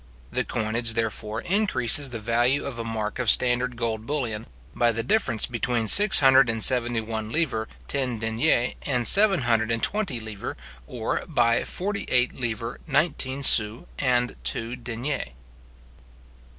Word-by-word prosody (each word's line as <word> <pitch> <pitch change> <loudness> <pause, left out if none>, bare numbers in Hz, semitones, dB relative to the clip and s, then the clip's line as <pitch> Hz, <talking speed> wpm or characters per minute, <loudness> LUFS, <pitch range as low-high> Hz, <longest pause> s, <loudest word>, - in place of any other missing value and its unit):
The - - -1
coinage, 115 0 -1
therefore, 110 -1 -3
increases 145 - +2
the 120 - -5
value 120 +5 +1
of 130 -4 -5
a - - -3
mark 110 0 -5
of 125 -3 +1
standard 125 +1 +3
gold 115 -1 -4
bullion, 120 -7 -3 0.3
by 120 +6 +1
the 115 0 -3
difference 200 - 0
between 120 -1 -2
six 205 - +7
hundred 135 -2 +5
and 115 -1 0
seventy 120 -2 +2
one 110 -1 -5
livres 130 -9 -1 0.2
ten 130 -4 -2
deniers 115 +3 0
and 125 -4 -1
seven 200 -5 +5
hundred 115 -2 0
and 115 0 -2
twenty 205 - -1
livres, 110 -2 -7 0.3
or 115 +3 -3
by 120 -7 +1
forty 200 +2 -4
eight 125 0 +2
livres 115 -1 -5
nineteen 140 -2 0
sous 110 -2 +4
and 125 -2 0
two 115 +2 -2
deniers. 125 +3 -4
120 Hz, 150 wpm, -24 LUFS, 115-135 Hz, 0.3 s, six